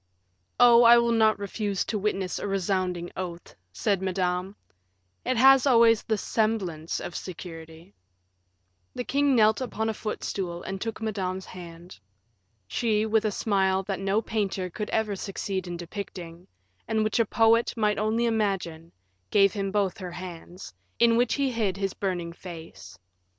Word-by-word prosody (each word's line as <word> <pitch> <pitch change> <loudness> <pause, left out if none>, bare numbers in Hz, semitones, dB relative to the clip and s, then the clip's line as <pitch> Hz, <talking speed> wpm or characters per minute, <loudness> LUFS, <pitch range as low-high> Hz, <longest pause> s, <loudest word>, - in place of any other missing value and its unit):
"Oh, 240 -1 +8
I 235 0 +8
will 235 0 +2
not 220 -1 +4
refuse 200 -1 -2
to 215 - -2
witness 195 -2 -2
a - - -4
resounding 185 -2 -1
oath," 175 -2 -6 0.2
said 190 - 0
Madame; 185 0 -1 0.7
"it 255 0 0
has 270 +2 +6
always 230 -3 +5
the 220 - -1
semblance 195 -8 -1
of 175 - -7
security." 165 0 -9 1.0
The 245 - -3
king 280 +1 +2
knelt 220 +1 +4
upon 225 -3 -2
a - - -1
footstool 190 -5 -4
and 195 0 -5
took 225 -1 -4
Madame's 190 -3 -3
hand. 170 - -11 0.7
She, 215 - 0
with 220 0 +1
a 215 - +1
smile 190 -2 +1
that 195 0 -3
no 195 +3 0
painter 195 -5 -2
could 210 +4 -5
ever 215 -2 0
succeed 190 -1 -4
in 175 0 -5
depicting, 175 -1 -8 0.4
and 220 -1 +1
which 215 +2 0
a 230 - +4
poet 225 +2 +3
might 210 -2 +1
only 220 +2 +1
imagine, 195 -7 -2 0.4
gave 200 -1 +4
him 195 -2 -2
both 200 -2 0
her 180 -2 -6
hands, 175 - -9 0.2
in 235 -1 +4
which 240 0 +2
he 275 -2 0
hid 210 -5 -1
his 195 -1 -2
burning 175 -4 -3
face. 165 - -11
200 Hz, 155 wpm, -26 LUFS, 180-220 Hz, 1.0 s, Oh